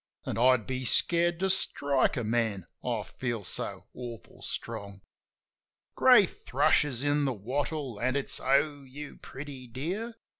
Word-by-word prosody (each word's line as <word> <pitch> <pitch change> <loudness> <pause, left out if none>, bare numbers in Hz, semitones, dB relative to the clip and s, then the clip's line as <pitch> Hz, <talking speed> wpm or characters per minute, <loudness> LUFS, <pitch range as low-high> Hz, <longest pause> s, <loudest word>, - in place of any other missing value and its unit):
An' - - -2
I'd 125 -2 +4
be 130 0 -3
scared 170 +6 +2
to 190 - +2
strike 140 -8 +1
a 120 - -1
man, 110 -4 0 0.2
I 115 -4 -1
feel 120 -3 -4
so 90 - -1
awful 120 -2 -9
strong. 100 -1 -4 0.9
Grey - - +7
thrush - - +2
is 135 -3 -1
in 145 0 +2
the 135 - +1
wattle, 130 +2 -3
an' 130 +2 +1
it's, 140 - 0
"O, 140 +2 +2
you 140 +2 -9
pretty 135 -2 -9
dear!" 180 - -4
130 Hz, 145 wpm, -29 LUFS, 120-145 Hz, 0.9 s, Grey